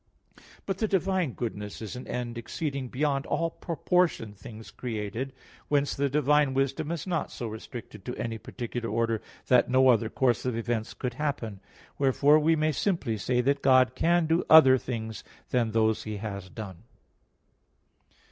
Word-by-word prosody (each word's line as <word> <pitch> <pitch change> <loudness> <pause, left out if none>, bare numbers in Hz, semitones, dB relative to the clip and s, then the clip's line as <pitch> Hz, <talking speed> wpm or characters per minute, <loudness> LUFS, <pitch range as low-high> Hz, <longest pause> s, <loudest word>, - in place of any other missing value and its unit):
But 195 -1 -3
the 220 - +1
divine 190 - 0
goodness 105 -4 -5
is 110 0 -6
an 125 - -8
end 120 -1 -4
exceeding 135 +3 -4
beyond 140 +2 -1
all 165 0 0
proportion 170 - 0
things 110 +1 -11
created. 115 +2 -4 0.4
Whence 145 -1 +1
the 140 0 0
divine 150 0 +3
wisdom 135 +3 0
is 170 -3 -3
not 170 -5 -1
so 120 - -5
restricted 110 -1 -9
to 125 - -4
any 115 -1 -3
particular 120 -1 -5
order 115 0 0 0.2
that 125 -1 +4
no 130 +1 +5
other 115 -2 +3
course 120 -4 +1
of 125 -3 -1
events 115 -1 -2
could 125 -2 -3
happen. 120 -7 -3 0.4
Wherefore 140 +2 +4
we 160 +2 +3
must 155 -2 0
simply 165 - 0
say 125 +4 0
that 140 +2 +1
God 130 -2 +5
can 170 +5 +2
do 165 +2 +2
other 135 -5 +8
things 110 -3 -5 0.3
than 120 -3 +2
those 110 0 +2
He 110 -1 -5
has 100 -3 -6
done. 95 -3 -8
125 Hz, 160 wpm, -28 LUFS, 115-150 Hz, 0.4 s, other